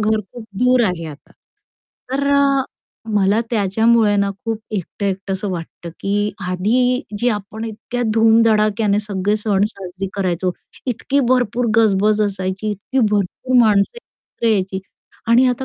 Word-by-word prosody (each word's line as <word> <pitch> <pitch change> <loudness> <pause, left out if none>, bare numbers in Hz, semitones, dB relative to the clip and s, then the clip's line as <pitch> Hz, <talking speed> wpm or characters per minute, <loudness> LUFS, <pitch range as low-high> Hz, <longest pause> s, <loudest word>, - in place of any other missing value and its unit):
घर 215 0 +1
खूप 240 -2 -9
दूर 250 0 +4
आहे 175 -5 -2
आता. 150 -1 -11 0.8
तर 275 +1 -1
अ, 275 -1 +3 0.5
मला 200 +2 +3
त्याच्यामुळे 220 0 +3
ना 200 0 +1
खूप 225 -1 -2
एकटं-एकट 195 0 -3
असं 190 +1 -3
वाटतं, 170 -1 -7
की 205 +1 0 0.2
आधी 245 +8 +1 0.2
जी 245 +4 +1
आपण 210 +2 -7
इतक्या 230 +2 -5
धूमधडाक्याने 220 -2 +3
सगळे 205 0 -1
सण 205 -2 0
साजरे 190 -2 -7
करायचो, 185 -2 -1 0.3
इतकी 265 +3 0
भरपूर 245 -1 +1
गजबज 215 -1 +3
असायची, 195 +1 -2
इतकी 210 +6 -3
भरपूर 210 +5 0
माणसं 210 - +3
एकत्र 235 - -8
यायची 190 -3 0 0.5
आणि 240 +3 +5
आता 250 +1 -1
210 Hz, 135 wpm, -19 LUFS, 195-230 Hz, 0.8 s, आणि